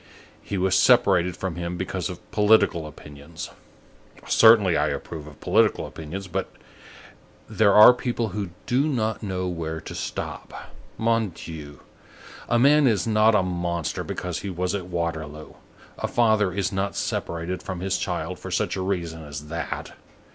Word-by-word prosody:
He 100 - -4
was 95 0 +2
separated 95 -8 +4
from 95 -3 -4
him 85 0 -4
because 95 +1 -3
of 90 - -10
political 105 -6 +3
opinions. 75 +1 -10 0.8
Certainly, 110 -6 +6
I - - +2
approve 80 -3 -5
of 75 - -13
political - - +2
opinions, 90 +5 -7
but 95 +2 -3 1.0
there 100 -2 +3
are 110 +4 +10
people 120 -2 -2
who 100 0 -4 0.2
do 135 +5 +2
not 110 -7 -1
know 95 -3 -3
where 80 -2 -4
to - - -8
stop. - - -6 0.3
Mon 115 -1 +1
Dieu! 80 -4 -10 0.7
a 120 - +3
man 140 +3 +5
is 105 -6 +2
not 110 0 +4
a 100 - +3
monster 85 -2 -2
because 90 -1 -4
he 100 - -5
was 90 +1 -2
at 95 -3 -3
Waterloo; 80 -3 -4 0.5
a - - -1
father 110 -5 +2
is 100 +2 -1
not 100 0 -2
separated 85 +2 -3
from 95 -2 -5
his 95 0 -1
child - - -3
for - - -7
such - - -1
a 95 - -3
reason 85 -4 -3
as 75 0 -8
that. 85 -1 -5
95 Hz, 155 wpm, -24 LUFS, 85-105 Hz, 1.0 s, are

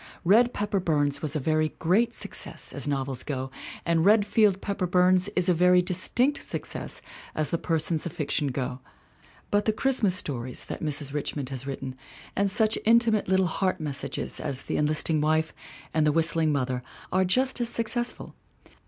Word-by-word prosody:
Red 230 +7 +5
Pepper 205 -3 -1
Burns 145 -5 0
was 155 -1 -2
a - - +1
very 155 +2 0
great 220 +8 +2
suc - - -2
cess - - -2
as - - -5
novels 135 -2 -2
go 135 -3 -4 0.3
and 165 -1 +2
Redfield 205 -1 +4
Pepper 195 -2 -2
Burns 180 +1 +4
is 180 - +2
a 180 - +5
very 180 +1 +4
distinct 235 +10 +1
success - - -5 0.3
as 155 -1 -1
the 170 - 0
persons 160 -1 -1
of - - -6
fiction 150 -3 -1
go; 130 -1 -3 0.7
but 205 0 +2
the 220 - +3
Christmas 215 -4 +2
stories 130 -7 -4
that - - -6
Mrs. 145 -2 +1
Richmond 145 -2 -3
has 135 0 -5
written 135 -1 -5 0.4
and 200 0 +2
such 215 +2 +2
intimate 225 -1 +3
little 190 0 +3
heart 185 +2 -1
messages 145 -3 -3
as 135 -1 -4
The - - -2
Enlisting 155 +1 +1
Wife 155 +1 +1 0.4
and 155 - +2
The - - +4
Whistling 160 0 +2
Mother 130 -3 -1 0.3
are 190 - +3
just 255 +7 +1
as 235 - +1
success 240 +1 -1
ful. - - -11
170 Hz, 175 wpm, -26 LUFS, 145-205 Hz, 0.7 s, Red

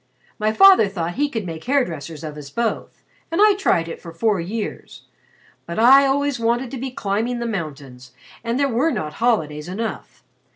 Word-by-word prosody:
"My 215 0 +1
father 385 - +7
thought 175 -3 -4
he 290 +6 0
could 225 -7 -4
make 160 -2 -7
hair 275 0 +2
dressers 160 -1 -8
of 155 -2 -6
us 145 -2 -9
both, 230 +7 -3 0.3
and 330 - -1
I 420 0 +6
tried 270 - +1
it 165 - -8
for 170 - -9
four 205 +3 0
years. 210 +5 -6 0.6
But 170 - -5
I 270 +5 +7
always 285 -1 0
wanted 235 +2 0
to 270 - -5
be 265 +2 -4
climbing 235 -1 -2
the 235 - -3
mountains 140 - -6 0.3
and 235 +2 -1
there 280 - +3
were 260 +5 +1
not 155 - -3
holidays 155 -11 0
enough. 220 +5 -6
220 Hz, 190 wpm, -21 LUFS, 165-260 Hz, 0.6 s, father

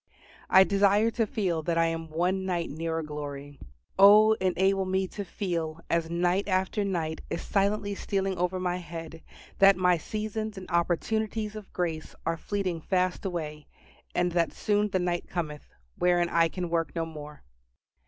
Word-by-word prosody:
I 190 - +8
desire 200 +3 +3
to 225 -2 0
feel 185 -7 -1
that 165 +1 -1
I 165 - +4
am 165 -1 -3
one 180 +4 0
night 175 -3 -2
nearer 165 +1 -3
glory. 145 -2 -7 0.4
Oh, 210 +2 +8
enable 190 +1 +2
me 190 0 0
to 205 - -5
feel, 170 -5 -3
as 170 -1 +1
night 175 +3 +1
after 190 +2 0
night 165 -5 -2
is - - -3
silently 200 0 0
stealing 195 -1 -1
over 180 +1 -1
my 180 -1 -1
head, 165 -1 -8 0.4
that 195 -1 +7
my 180 -2 +3
seasons 215 +2 -4
and 185 - -8
opportunities 210 +5 0
of 210 -2 -9
grace 165 -3 -3
are 165 +1 +1
fleeting 185 -2 -3
fast 185 +2 0
away, 155 -5 -4 0.5
and 180 0 +1
that 170 -1 +1
soon 210 0 +1
the 190 - 0
night 175 -1 -1
cometh, 155 -4 -4 0.3
wherein 175 -1 +3
I 165 -1 +3
can 175 0 -4
work 165 -4 -1
no 165 -1 -1
more. 150 -2 -10
180 Hz, 165 wpm, -28 LUFS, 165-195 Hz, 0.5 s, I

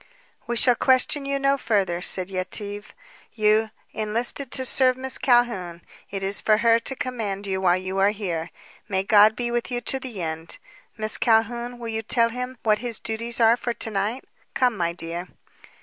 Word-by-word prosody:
"We 240 - -1
shall 245 +1 +5
question 260 +3 +2
you 275 0 0
no 275 0 +1
further," 195 -7 0
said 185 +1 0
Yetive. 205 +2 -4 0.4
"You 215 0 +3 0.2
enlisted 230 +5 -2
to 260 - 0
serve 255 0 +3
Miss 260 0 -1
Calhoun. 230 -9 +1 0.3
It 195 -1 -5
is 195 +1 +1
for 215 -1 +3
her 230 +1 +4
to 265 +3 -3
command 215 -7 -4
you 190 -1 -2
while 180 -1 +3
you 185 +1 -4
are 195 +1 +5
here. 180 -6 -3 0.4
May 190 -1 0
God 210 +1 +6
be 240 0 -2
with 240 +1 -2
you 245 -1 -2
to 265 +3 +1
the 250 -6 -7
end. 160 +1 -5 0.4
Miss 215 -1 0
Calhoun, 235 +1 +1
will 235 -1 -6
you 220 0 -2
tell 230 +1 +2
him 250 +2 -5
what 215 -1 +2
his 235 -1 -4
duties 230 +2 -3
are 230 0 +6
for 240 0 -4
to 225 - -1
night? 210 +6 -2 0.3
Come, 250 -3 +2
my 170 -3 -1
dear." 170 +1 -6
220 Hz, 185 wpm, -24 LUFS, 195-245 Hz, 0.4 s, God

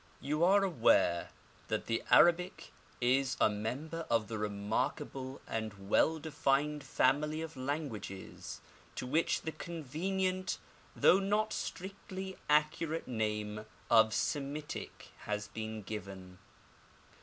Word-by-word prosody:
You 150 +4 0
are 195 +3 +6
aware 115 - +3 0.4
that - - -1
the 115 - 0
Arabic 175 +1 +4 0.3
is 130 +2 +2
a - - +5
member 140 +11 -4
of 115 -3 +2
the 110 -2 -3
remarkable 125 +6 -2
and 100 -3 -5
well 160 +8 +4
defined 150 -1 0
family 150 +4 +2
of 160 0 -7
languages 130 -8 -5 0.3
to - - -4
which 155 +6 +1
the 160 - -2
convenient, 185 +5 -2 0.4
though 190 - +6
not 210 +2 +1
strictly 190 0 -5
accurate, 150 +2 +2
name 105 -2 -2 0.2
of 110 -1 +7
Semitic 145 +5 -3
has 105 -1 -3
been 110 -1 -5
given. 95 -3 -7
140 Hz, 110 wpm, -33 LUFS, 110-165 Hz, 0.4 s, of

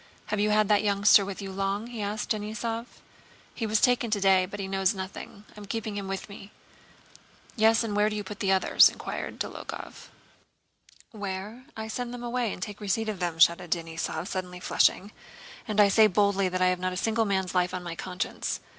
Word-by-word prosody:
"Have 210 - 0
you 210 +1 +2
had 210 0 +3
that 210 0 +3
youngster 200 0 +5
with 200 +1 -6
you 195 - -6
long?" 195 +2 -2
he 235 -2 -7
asked 205 +1 -3
Denísov. 225 +2 -3 0.7
"He 225 - -3
was 215 0 +2
taken 245 0 +3
today 195 -3 +3
but 205 +2 -8
he 195 - -3
knows 195 +1 +1
nothing. 195 +2 -8
I'm 210 -1 -10
keeping 220 -1 -4
him 200 -1 -4
with 195 0 -4
me." 200 -1 -11 1.1
"Yes, 225 0 +4
and 215 -3 -3
where 210 +1 +3
do 210 - -4
you 210 - -3
put 205 +1 -8
the 195 -2 +1
others?" 190 -1 +6
inquired - - -6
Dólokhov. - - -7 1.0
"Where? 205 +3 -6
I 220 0 -5
send 245 +2 -4
them 245 - -8
away 240 -2 -1
and 180 - -5
take 205 +1 -7
a - - -7
weceipt 220 +3 0
for - - -4
them," 175 -4 -3
shouted 170 +1 +4
Denísov, 165 0 -3
suddenly 180 -2 -5
flushing. 195 +2 +2 0.6
"And 215 -1 -1
I 205 - +8
say 215 +2 +6
boldly 200 -1 +2
that 185 0 0
I 185 - +5
have 180 0 -1
not 185 0 -2
a - - -5
single 225 +3 +1
man's 190 -2 -1
life 180 -1 +1
on 180 -1 -5
my 175 -1 -5
conscience. 180 +2 -4
200 Hz, 205 wpm, -27 LUFS, 190-215 Hz, 1.1 s, I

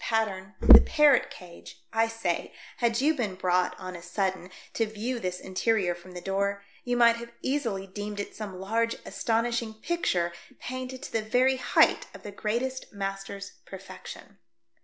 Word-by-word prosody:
pattern, 210 -3 -1
the - - +10
parrot 295 -4 +4
cage 175 -2 -12
— - - -30
I 225 0 +3
say, 225 -7 -3 0.2
had 235 0 +1
you 305 +3 +4
been 215 -10 -2
brought 180 0 +1
on 185 0 -6
a 175 - -8
sudden 185 0 -2 0.2
to 225 - +1
view 225 +4 -3
this 180 -3 -3
interior 190 -1 +1
from 175 +1 -13
the 180 - -7
door, 200 +1 -1 0.2
you 245 0 0
might 235 -1 +6
have 235 0 -9
easily 235 -9 -1
deemed 205 +2 -6
it 205 - -5
some 195 -4 -6
large 230 +4 0
astonishing 230 0 -1
picture 215 - 0 0.3
painted 255 +1 -6
to - - -7
the 225 - 0
very 250 +4 +2
height - - +3
of - - -12
the 205 - -7
greatest 240 +6 -3
master's 195 0 -5
perfection. 195 +1 -10
210 Hz, 165 wpm, -28 LUFS, 190-235 Hz, 0.3 s, the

